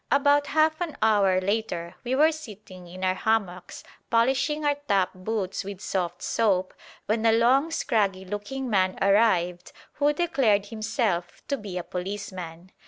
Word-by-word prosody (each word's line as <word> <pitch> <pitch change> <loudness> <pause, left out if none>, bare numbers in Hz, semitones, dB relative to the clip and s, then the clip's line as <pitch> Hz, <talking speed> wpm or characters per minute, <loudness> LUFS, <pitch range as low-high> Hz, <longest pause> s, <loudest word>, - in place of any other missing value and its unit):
About 285 +1 +3
half 315 +1 +2
an 335 -4 -3
hour 200 -4 +4
later 185 -4 -2
we 250 +1 -1
were 310 +4 +5
sitting 210 - -11
in 185 +2 -9
our 185 0 +2
hammocks 190 -3 -2 0.3
polishing 265 +6 +1
our 290 - +3
top 195 -3 +2
boots 190 0 -3
with 195 -1 -7
soft 175 -3 -3
soap, 190 -5 +1 0.3
when 220 +1 0
a 225 - +5
long 250 +7 +3
scraggy 200 -11 0
looking 205 +7 -5
man 190 -4 +1
arrived 185 -4 +2 0.3
who 290 0 +3
declared 270 - +1
himself 215 -5 -2
to 280 - +1
be 205 -7 -7
a 180 - -3
policeman. 185 -2 -6
210 Hz, 150 wpm, -26 LUFS, 185-260 Hz, 0.3 s, were